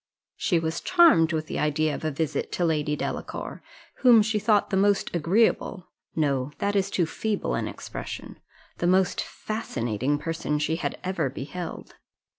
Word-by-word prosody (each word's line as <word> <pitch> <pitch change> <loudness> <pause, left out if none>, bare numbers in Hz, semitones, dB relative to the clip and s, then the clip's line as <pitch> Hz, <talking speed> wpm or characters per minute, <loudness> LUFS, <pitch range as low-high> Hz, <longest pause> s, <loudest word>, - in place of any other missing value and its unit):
She 175 - +1
was 165 0 -2
charmed 330 - +5
with 155 -1 -1
the - - -4
idea 150 0 +1
of - - -6
a 155 - +1
visit 155 +1 -2
to 175 - +1
Lady 150 -2 +1
Delacour, - - -5 0.4
whom 240 -4 +6
she 215 0 0
thought 210 0 +2
the - - +1
most 200 -1 +2
agreeable 185 +2 +1 0.2
no, 140 -3 0
that 205 0 -1
is 195 0 +2
too 180 -3 +1
feeble 210 +6 -2
an - - -1
expression - - -7 0.4
the 175 - +1
most 185 +1 +3
fascinating 130 - -2
person 165 -1 -2
she 155 +2 0
had - - -3
ever 185 -7 -1
beheld. 160 +6 -7
165 Hz, 160 wpm, -26 LUFS, 150-200 Hz, 0.4 s, whom